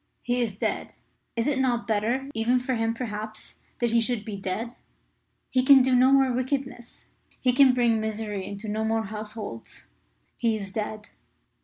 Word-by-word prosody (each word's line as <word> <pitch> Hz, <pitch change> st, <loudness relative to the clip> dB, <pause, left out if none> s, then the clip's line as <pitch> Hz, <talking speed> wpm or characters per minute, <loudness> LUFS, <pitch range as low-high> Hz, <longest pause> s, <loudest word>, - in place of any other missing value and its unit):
He 245 Hz, 0 st, 0 dB
is 220 Hz, -5 st, -1 dB
dead. -, -, -2 dB, 0.4 s
Is 230 Hz, -1 st, 0 dB
it 285 Hz, -2 st, +1 dB
not 245 Hz, -3 st, +1 dB
better 230 Hz, +5 st, 0 dB
even 235 Hz, +3 st, +2 dB
for 250 Hz, +1 st, -2 dB
him, 225 Hz, -1 st, 0 dB
perhaps 215 Hz, -2 st, -6 dB, 0.2 s
that 240 Hz, -2 st, 0 dB
he 230 Hz, 0 st, +4 dB
should 230 Hz, -2 st, -1 dB
be 215 Hz, -3 st, -5 dB
dead? 200 Hz, +5 st, -4 dB, 0.8 s
He 255 Hz, -1 st, +3 dB
can 265 Hz, 0 st, +8 dB
do 260 Hz, 0 st, +2 dB
no 255 Hz, +2 st, +5 dB
more 270 Hz, -1 st, +5 dB
wickedness; 255 Hz, -1 st, -4 dB, 0.3 s
he 250 Hz, -1 st, +2 dB
can 260 Hz, -1 st, +6 dB
bring 235 Hz, -3 st, +3 dB
misery 215 Hz, -2 st, -3 dB
into 200 Hz, +3 st, -7 dB
no 215 Hz, +1 st, -1 dB
more 225 Hz, 0 st, +1 dB
households. 210 Hz, -, -8 dB, 0.5 s
He 230 Hz, -2 st, +1 dB
is 200 Hz, -2 st, -6 dB
dead." 210 Hz, 0 st, -4 dB
230 Hz, 170 wpm, -26 LUFS, 215-250 Hz, 0.8 s, can